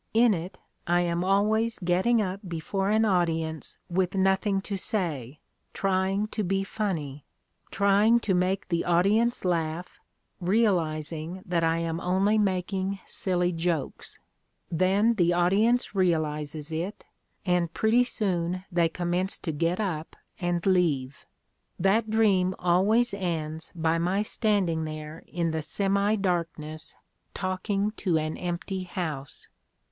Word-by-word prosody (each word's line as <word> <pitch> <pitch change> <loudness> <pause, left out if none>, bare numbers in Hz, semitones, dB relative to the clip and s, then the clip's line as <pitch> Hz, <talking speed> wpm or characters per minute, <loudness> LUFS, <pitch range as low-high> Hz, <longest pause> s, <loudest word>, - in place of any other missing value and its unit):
In 230 -1 +6
it 175 +1 -5 0.3
I 175 +1 +3
am 170 0 0
always 215 +4 +2
getting 190 +6 +2
up 190 0 -3
before 175 +4 -2
an 220 +1 +3
audience 165 -5 0
with 180 +1 0
nothing 195 +1 +2
to 200 0 -4
say, 155 - -3 0.3
trying 195 +1 +1
to 215 - -2
be 195 +1 0
funny; 160 -10 -3 0.5
trying 205 +4 +4
to 200 - 0
make 185 +2 0
the 170 -1 +1
audience 200 +7 +2
laugh, 170 0 -2 0.4
realizing 175 -4 0
that 175 -2 0
I 165 0 +2
am 165 0 -2
only 195 +5 +2
making 190 0 0
siUy 180 -2 -1
jokes. 165 -4 -2 0.5
Then 195 +7 +3
the 175 -5 +2
audience 205 +9 +2
realizes 155 -4 -1
it, 170 +6 -4 0.4
and 180 -2 +1
pretty 220 +6 +3
soon 185 -6 -1
they 170 -1 +2
commence 175 +3 -1
to 165 - -4
get 165 +5 0
up 170 -7 -3 0.2
and 175 -2 -1
leave. 155 -8 +1 0.5
That 205 +5 +2
dream 195 -4 +3
always 200 +7 +3
ends 160 -4 -3
by 165 0 +1
my 185 +5 +1
standing 200 -7 0
there 155 +1 -7
in 170 -2 -1
the 160 0 -2
semi 200 +5 +1
darkness 165 -5 -3 0.4
talking 195 +2 -1
to 175 -5 +1
an 155 0 -2
empty 180 +2 -3
house." 160 -7 -5
180 Hz, 130 wpm, -27 LUFS, 165-200 Hz, 0.5 s, In